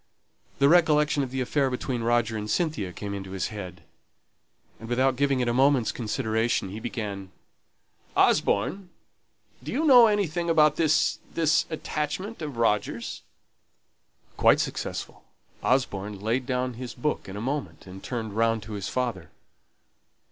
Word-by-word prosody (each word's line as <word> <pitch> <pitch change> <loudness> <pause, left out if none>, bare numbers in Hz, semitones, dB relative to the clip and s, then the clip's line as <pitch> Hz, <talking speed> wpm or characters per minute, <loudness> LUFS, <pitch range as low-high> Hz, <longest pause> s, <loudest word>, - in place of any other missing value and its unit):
The 140 - +4
recollection 150 -3 +4
of 135 - -2
the 130 +1 -3
affair 135 +2 +1
between 125 -1 -3
Roger 115 -1 +1
and 105 0 -4
Cynthia 150 - -1
came 100 +3 -6
into 95 -1 -6
his 95 - -2
head, 100 -5 -8 1.0
and, 115 - -9
without 130 +2 +2
giving 140 -1 +1
it 125 - 0
a 120 - +1
moment's 135 -1 +3
consideration, 110 -2 -1
he 105 +3 -6
began, 105 -5 -5 0.9
"Osborne! 180 - +2 0.7
Do - - -6
you 310 +4 0
know 250 -5 +8
anything 175 -5 0
about 155 -2 +4
this 160 0 +2 0.2
this 160 -2 +2
attachment 160 +6 -4
of 145 -6 -5
Roger's?" 105 -3 -1 1.2
Quite - - +5
successful. - - -4 0.4
Osborne 105 -6 0
laid 120 +5 -1
down 125 -1 -1
his 125 +1 -7
book 130 -4 -2
in 95 - -7
a - - -4
moment, 135 +5 -4
and 95 0 -11
turned 110 -5 -4
round 115 -1 +1
to 110 +1 -8
his 100 -2 -4
father. 115 -11 -3
125 Hz, 145 wpm, -26 LUFS, 105-150 Hz, 1.2 s, know